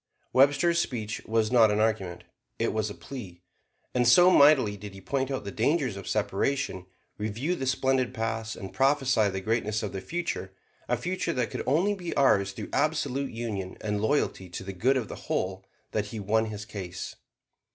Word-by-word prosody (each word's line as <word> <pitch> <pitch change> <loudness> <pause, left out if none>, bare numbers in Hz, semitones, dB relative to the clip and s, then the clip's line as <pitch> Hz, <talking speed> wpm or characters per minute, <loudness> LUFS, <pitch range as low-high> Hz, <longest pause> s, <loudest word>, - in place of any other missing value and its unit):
Webster's 145 +6 +4
speech 110 -9 -3
was 110 0 +1
not 115 -3 +6
an 105 0 +1
argument; 105 -5 0 0.3
it - - 0
was 110 -1 0
a 105 - -7
plea. 95 -10 -9 0.5
And 125 -1 +2
so 175 +9 +7
mightily 140 - +6
did 100 0 -9
he - - -9
point 130 +7 -1
out 135 -4 -3
the 100 - -5
dangers 130 0 +1
of 100 - -8
separation; 105 -2 -1 0.3
review 110 +11 -1
the 135 -7 -3
splendid 130 -1 +1
past; 110 -1 -3
and 95 - -8
prophesy 135 -6 +3
the 95 0 -4
greatness 110 +1 0
of 105 - -4
the 95 - -4
future 95 - -4 0.4
a 125 - +2
future 180 +10 -2
that 120 -4 -1
could - - -3
only 170 +10 +3
be 180 -4 -5
ours 100 -8 +4
through - - -7
absolute 140 -3 0
union 105 -5 -4
and 105 -1 -2
loyalty 110 -6 0
to 90 - -6
the 95 0 -6
good 130 +9 +2
of 120 -5 -2
the - - -7
whole 95 +1 -2 0.2
that 105 -1 0
he 110 - -6
won 110 +3 +1
his 105 -1 -6
cause. 95 -4 -6
110 Hz, 185 wpm, -28 LUFS, 100-135 Hz, 0.5 s, so